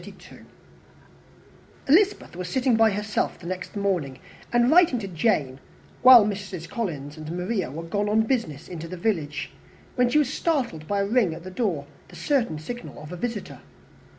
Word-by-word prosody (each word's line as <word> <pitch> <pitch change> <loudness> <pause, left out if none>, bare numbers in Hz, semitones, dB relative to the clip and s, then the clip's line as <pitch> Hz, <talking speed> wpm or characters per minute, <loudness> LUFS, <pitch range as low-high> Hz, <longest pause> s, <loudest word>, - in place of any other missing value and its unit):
Elizabeth 385 - +3
was 180 0 -5
sitting 255 +2 +2
by 225 0 +5
herself 210 +1 -2
the - - -14
next 185 +2 -5
morning, 180 -10 -1 0.3
and 240 +1 +3
writing 335 -6 +5
to 210 -4 -4
Jane, 160 - 0 0.4
while 250 -4 +9
Mrs. 195 -5 -5
Collins 150 - -4
and 155 0 -8
Maria 180 - -2
were 160 +5 -6
gone 205 +5 -1
on 215 +1 +3
business 220 - -2
into 165 -2 -7
the 185 +2 -7
village, 165 -7 -2 0.4
when 250 -1 +3
she 300 - +2
was 295 -2 +2
startled 245 - -1
by 200 -1 0
a - - +1
ring 205 -6 +2
at 165 - -10
the 185 - -8
door, 185 - -1 0.2
the - - -15
certain 245 - 0
signal 240 +11 -8
of 150 +2 -10
a - - -5
visitor. 225 +4 -5
200 Hz, 170 wpm, -25 LUFS, 165-240 Hz, 0.4 s, while